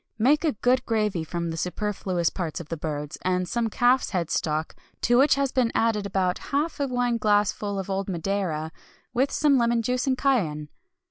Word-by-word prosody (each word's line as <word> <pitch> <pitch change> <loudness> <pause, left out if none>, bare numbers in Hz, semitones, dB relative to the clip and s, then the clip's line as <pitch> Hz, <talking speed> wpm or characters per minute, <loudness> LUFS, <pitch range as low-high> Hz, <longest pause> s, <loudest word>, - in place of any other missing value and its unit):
Make 280 +8 +3
a 310 -4 +2
good 250 +4 +2
gravy 210 -6 0
from 170 +1 -3
the 165 - -5
superfluous 180 -1 -1
parts 170 -5 -4
of 165 -3 -9
the 165 - -2
birds, 150 -2 -5
and 180 0 0
some 235 +3 -1
calf's 245 +4 +2
head 175 -5 -2
stock 155 0 -1 0.3
to 240 +1 +4
which 280 +1 +5
has 275 -1 0
been 250 -3 +1
added 215 -3 +1
about 185 -2 0
half 295 +3 -1
a 280 - 0
wine 245 -2 0
glassful 205 -1 +1
of 195 -1 -4
old 195 0 -2
Madeira, 170 -3 -2 0.4
with 260 +3 +2
some 285 -3 +3
lemon 235 0 +2
juice 250 +3 -1
and 260 -1 +2
cayenne. 165 - 0
210 Hz, 190 wpm, -25 LUFS, 175-250 Hz, 0.4 s, which